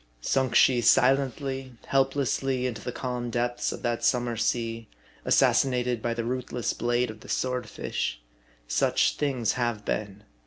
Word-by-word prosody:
Sunk 130 Hz, -, 0 dB
she 125 Hz, -2 st, +5 dB
silently, 135 Hz, +1 st, +2 dB
help 135 Hz, 0 st, +2 dB
lessly, 135 Hz, -2 st, 0 dB
into 120 Hz, -4 st, -3 dB
the 125 Hz, -, -4 dB
calm 125 Hz, -1 st, -4 dB
depths 120 Hz, +1 st, -1 dB
of -, -, -7 dB
that 120 Hz, -1 st, -1 dB
summer 120 Hz, -2 st, +1 dB
sea, 115 Hz, 0 st, -1 dB, 0.4 s
assassinated 125 Hz, -3 st, +2 dB
by 115 Hz, 0 st, -1 dB
the 115 Hz, -, -2 dB
ruthless 125 Hz, -1 st, -2 dB
blade 120 Hz, 0 st, 0 dB
of 110 Hz, -, -13 dB
the -, -, -14 dB
swordfish? 125 Hz, -, -2 dB, 0.5 s
Such -, -, +2 dB
things 130 Hz, -6 st, 0 dB
have 120 Hz, -4 st, -2 dB
been. 105 Hz, -1 st, -3 dB
120 Hz, 145 wpm, -27 LUFS, 115-130 Hz, 0.5 s, she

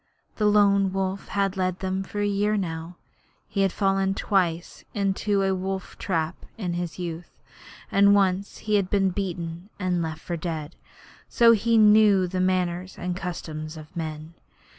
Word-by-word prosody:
The 210 Hz, -, +2 dB
Lone 200 Hz, -2 st, +4 dB
Wolf 195 Hz, 0 st, -2 dB
had 195 Hz, -1 st, 0 dB
led 185 Hz, -1 st, 0 dB
them 190 Hz, 0 st, -2 dB
for 205 Hz, +2 st, -4 dB
a -, -, +1 dB
year 205 Hz, +1 st, +1 dB
now. 165 Hz, -2 st, -4 dB, 0.5 s
He 200 Hz, -, -1 dB
had 195 Hz, -1 st, +3 dB
fallen 195 Hz, 0 st, +1 dB
twice 175 Hz, -5 st, -1 dB
into 200 Hz, 0 st, +1 dB
a 195 Hz, 0 st, +2 dB
wolf 190 Hz, 0 st, -4 dB
trap 165 Hz, -2 st, -1 dB, 0.2 s
in 180 Hz, -6 st, -3 dB
his 175 Hz, -1 st, -4 dB
youth, 170 Hz, -2 st, -5 dB, 0.6 s
and 200 Hz, +1 st, +6 dB
once 195 Hz, 0 st, +1 dB
he 215 Hz, -1 st, +3 dB
had 190 Hz, -2 st, 0 dB
been 195 Hz, -2 st, +2 dB
beaten 175 Hz, -1 st, -4 dB
and 180 Hz, -3 st, 0 dB
left 160 Hz, -1 st, -4 dB
for 175 Hz, -, -4 dB
dead; 160 Hz, -1 st, -5 dB, 0.5 s
so 235 Hz, -1 st, +6 dB
he 230 Hz, +1 st, +3 dB
knew 210 Hz, -3 st, +6 dB
the 185 Hz, +1 st, -2 dB
manners 185 Hz, 0 st, -1 dB
and 180 Hz, 0 st, -3 dB
customs 160 Hz, -4 st, -5 dB
of 155 Hz, +2 st, -12 dB
men. 155 Hz, -1 st, -5 dB
185 Hz, 160 wpm, -25 LUFS, 175-200 Hz, 0.6 s, and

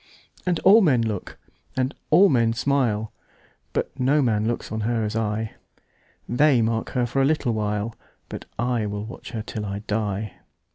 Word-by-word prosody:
And 175 Hz, -2 st, +2 dB
all 205 Hz, +4 st, +7 dB
men 130 Hz, -, +3 dB
look, 105 Hz, -4 st, -4 dB, 0.4 s
and 130 Hz, +1 st, 0 dB, 0.2 s
all 180 Hz, +6 st, +7 dB
men 115 Hz, -7 st, +3 dB
smile, 115 Hz, -4 st, 0 dB, 0.6 s
But -, -, -3 dB
no 140 Hz, +3 st, +3 dB
man 110 Hz, -3 st, +1 dB
looks 120 Hz, -, -3 dB
on 110 Hz, -, -2 dB
her 115 Hz, +1 st, 0 dB
as 105 Hz, +1 st, -2 dB
I:They 115 Hz, +4 st, -1 dB
mark 115 Hz, 0 st, -1 dB
her 125 Hz, -, +3 dB
for 135 Hz, +3 st, 0 dB
a -, -, +4 dB
little 140 Hz, -5 st, +1 dB
while, 105 Hz, +1 st, -2 dB, 0.3 s
But -, -, -7 dB
I 120 Hz, -2 st, 0 dB
will 105 Hz, 0 st, -4 dB
watch 115 Hz, -, -9 dB
her 110 Hz, -4 st, -4 dB
till 110 Hz, 0 st, -5 dB
I 100 Hz, 0 st, -4 dB
die. 105 Hz, -1 st, -2 dB
115 Hz, 170 wpm, -24 LUFS, 105-130 Hz, 0.6 s, all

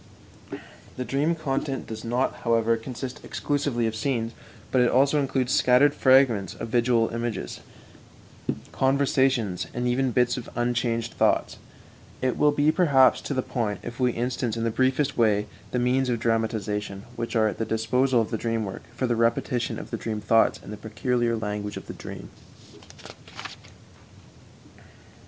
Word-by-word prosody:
The 125 Hz, -, -3 dB
dream 150 Hz, +6 st, +1 dB
content 135 Hz, -3 st, -2 dB
does 110 Hz, -1 st, -7 dB
not, 120 Hz, +3 st, -1 dB
however, 115 Hz, -1 st, +2 dB
consist 125 Hz, +2 st, -7 dB
exclusively 140 Hz, -5 st, -1 dB
of 110 Hz, -1 st, -1 dB
scenes, 115 Hz, -1 st, -1 dB, 0.4 s
but 130 Hz, -, +3 dB
it 125 Hz, -, +4 dB
also 140 Hz, +4 st, +3 dB
includes 130 Hz, -2 st, 0 dB
scattered 130 Hz, +3 st, +5 dB
fragments 130 Hz, -9 st, +3 dB
of 115 Hz, -, -6 dB
visual 115 Hz, -1 st, +2 dB
images, 115 Hz, -, -4 dB, 1.1 s
conversations, 130 Hz, -7 st, +1 dB
and 125 Hz, 0 st, -1 dB
even 130 Hz, +2 st, +1 dB
bits 125 Hz, +1 st, +2 dB
of 120 Hz, -, -7 dB
unchanged 120 Hz, -1 st, -1 dB
thoughts. -, -, +1 dB, 0.6 s
It 130 Hz, -1 st, 0 dB
will 150 Hz, -, +4 dB
be 145 Hz, +1 st, +3 dB
perhaps 140 Hz, -8 st, +4 dB
to 140 Hz, -, -4 dB
the 130 Hz, -, 0 dB
point 110 Hz, -5 st, -2 dB
if 120 Hz, -, -7 dB
we 125 Hz, -2 st, +2 dB
instance 120 Hz, -1 st, -2 dB
in 115 Hz, -, -2 dB
the 115 Hz, -, 0 dB
briefest 130 Hz, +3 st, +1 dB
way 105 Hz, -2 st, +3 dB, 0.2 s
the -, -, -2 dB
means 125 Hz, +1 st, +1 dB
of 120 Hz, -2 st, 0 dB
dramatization 105 Hz, -3 st, -1 dB
which 115 Hz, +1 st, -4 dB
are 110 Hz, -1 st, +4 dB
at 105 Hz, -, -4 dB
the -, -, +1 dB
disposal 120 Hz, +3 st, +2 dB
of 110 Hz, -, -4 dB
the 110 Hz, -, -2 dB
dream 115 Hz, -2 st, -1 dB
work 95 Hz, -, -6 dB
for 130 Hz, -, -1 dB
the 120 Hz, -1 st, +1 dB
repetition 115 Hz, +1 st, 0 dB
of -, -, -9 dB
the -, -, -2 dB
dream 110 Hz, -2 st, -4 dB
thoughts 110 Hz, +2 st, +3 dB
in -, -, -9 dB
the 105 Hz, -, -6 dB
peculiar 120 Hz, +2 st, -1 dB
language 105 Hz, -1 st, -4 dB
of -, -, -8 dB
the -, -, -7 dB
dream. -, -, -9 dB
120 Hz, 160 wpm, -25 LUFS, 115-130 Hz, 1.1 s, scattered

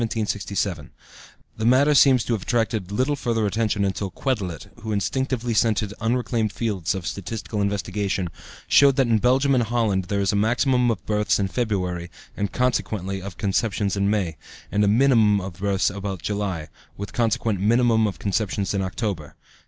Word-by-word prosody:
The 100 Hz, -6 st, -2 dB, 0.7 s
matter 130 Hz, +6 st, +4 dB
seems 130 Hz, -4 st, +5 dB
to 120 Hz, -, -1 dB
have 110 Hz, -, -1 dB
attracted 110 Hz, -4 st, -1 dB
little 130 Hz, +8 st, +1 dB
further 115 Hz, -5 st, -1 dB
attention 105 Hz, -1 st, 0 dB
until 95 Hz, 0 st, -2 dB
Quetelet, 95 Hz, -5 st, -3 dB, 0.2 s
who 110 Hz, 0 st, -4 dB
instinctively 120 Hz, +3 st, -1 dB
scented 110 Hz, -2 st, +1 dB
unreclaimed 115 Hz, -1 st, 0 dB
fields 100 Hz, -7 st, -2 dB
of 95 Hz, -3 st, -5 dB
statistical 105 Hz, +2 st, -4 dB
investigation, 100 Hz, -2 st, -1 dB, 0.4 s
showed 140 Hz, -2 st, +6 dB
that 135 Hz, -, +3 dB
in 115 Hz, -2 st, +2 dB
Belgium 135 Hz, +4 st, +3 dB
and 125 Hz, -2 st, +3 dB
Holland 110 Hz, -5 st, 0 dB
there 100 Hz, +2 st, -1 dB
is 100 Hz, +1 st, +1 dB
a -, -, +1 dB
maximum 125 Hz, +4 st, +2 dB
of 110 Hz, -5 st, -2 dB
births 105 Hz, -1 st, +1 dB
in 100 Hz, -1 st, -1 dB
February, 90 Hz, -7 st, -2 dB, 0.3 s
and, 100 Hz, -2 st, -2 dB
consequently, 100 Hz, -6 st, -1 dB
of 95 Hz, 0 st, -8 dB
conceptions 100 Hz, 0 st, 0 dB
in 100 Hz, 0 st, +1 dB
May, 95 Hz, -7 st, -1 dB, 0.3 s
and 105 Hz, 0 st, +2 dB
a -, -, +3 dB
minimum 110 Hz, -2 st, +4 dB
of 95 Hz, -1 st, -6 dB
births 100 Hz, 0 st, +1 dB
about 100 Hz, -3 st, -5 dB
July, 100 Hz, -7 st, -3 dB, 0.3 s
with 100 Hz, 0 st, -6 dB
consequent 115 Hz, -3 st, 0 dB
minimum 115 Hz, +1 st, +3 dB
of 100 Hz, -, -4 dB
conceptions 100 Hz, -1 st, -1 dB
in 100 Hz, -, 0 dB
October. 95 Hz, -5 st, -4 dB
105 Hz, 160 wpm, -23 LUFS, 100-115 Hz, 0.7 s, showed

